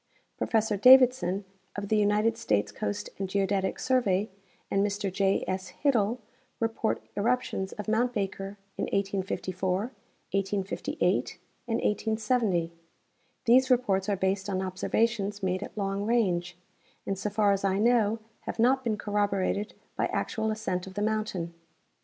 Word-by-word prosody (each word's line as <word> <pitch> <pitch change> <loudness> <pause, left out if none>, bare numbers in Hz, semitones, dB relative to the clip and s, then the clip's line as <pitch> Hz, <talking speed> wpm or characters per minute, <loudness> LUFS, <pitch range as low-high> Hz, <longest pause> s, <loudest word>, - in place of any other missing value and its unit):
Professor 220 -2 +1
Davidson, 250 -5 +6 0.3
of 205 0 -4
the 220 - +3
United 210 +2 +3
States 105 -1 0
Coast 100 0 -4
and 195 -1 -2
Geodetic 195 0 0
Survey, 210 -6 +1 0.4
and 195 - +3
Mr 205 -2 -1
J. 195 0 +2
S. 185 -1 -3
Hittel 235 -5 +3 0.4
report 225 0 -1
eruptions 215 -3 0
of 210 - -7
mount 230 +3 +2
Baker 195 -2 -3 0.2
in - - +1
1854, 190 -2 -1 0.5
1858 195 0 -1 0.3
and 225 - 0
1870. 220 -5 0 0.7
These 255 +3 +5
reports 215 -6 +2
are 200 - +2
based 195 +1 -1
on 190 -1 -1
observations 205 +2 -1
made 185 0 0
at - - -8
long 200 0 -1
range, 175 -7 +1 0.5
and 195 - -1
so 195 +2 -3
far 205 0 +3
as 195 0 0
I 195 -1 +2
know 225 -1 +3 0.3
have - - -3
not 260 +3 +3
been 225 -3 0
corroborated 205 0 -1 0.2
by - - +1
actual 220 0 -1
ascent 190 -4 -2
of 190 - -10
the 205 - -1
mountain. 215 -6 -2
205 Hz, 140 wpm, -28 LUFS, 190-220 Hz, 0.7 s, Davidson